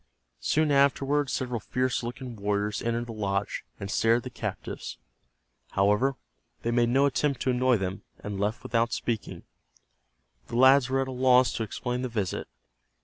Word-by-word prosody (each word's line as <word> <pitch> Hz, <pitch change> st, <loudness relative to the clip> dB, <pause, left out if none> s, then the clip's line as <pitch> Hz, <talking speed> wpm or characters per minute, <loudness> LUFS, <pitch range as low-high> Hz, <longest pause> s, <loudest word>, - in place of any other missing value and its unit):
Soon 150 Hz, -, +1 dB
afterward 140 Hz, 0 st, +3 dB
several 125 Hz, -1 st, -2 dB
fierce 125 Hz, +5 st, -1 dB
looking 120 Hz, 0 st, -6 dB
warriors 105 Hz, 0 st, -1 dB
entered 115 Hz, 0 st, -1 dB
the 120 Hz, -, -7 dB
lodge, 100 Hz, -2 st, -2 dB, 0.2 s
and 100 Hz, +1 st, -5 dB
stared 115 Hz, +1 st, +3 dB
at 120 Hz, -, -5 dB
the 125 Hz, -, -6 dB
captives. 85 Hz, -, -5 dB, 0.8 s
However, 105 Hz, +8 st, +3 dB, 0.5 s
they 115 Hz, -, 0 dB
made 120 Hz, 0 st, +3 dB
no 135 Hz, +3 st, +4 dB
attempt 140 Hz, 0 st, +1 dB
to 130 Hz, -, +2 dB
annoy 125 Hz, -1 st, +3 dB
them, 95 Hz, 0 st, -3 dB, 0.2 s
and 100 Hz, -2 st, -6 dB
left 105 Hz, +3 st, -1 dB
without 115 Hz, 0 st, +1 dB
speaking. 115 Hz, -3 st, -3 dB, 1.0 s
The 115 Hz, -, -6 dB
lads 130 Hz, +1 st, +6 dB
were 135 Hz, 0 st, +1 dB
at -, -, -7 dB
a -, -, -4 dB
loss 130 Hz, 0 st, +4 dB
to -, -, -3 dB
explain 125 Hz, +3 st, -3 dB
the 130 Hz, -, -2 dB
visit. 105 Hz, -5 st, -2 dB
120 Hz, 165 wpm, -27 LUFS, 105-130 Hz, 1.0 s, lads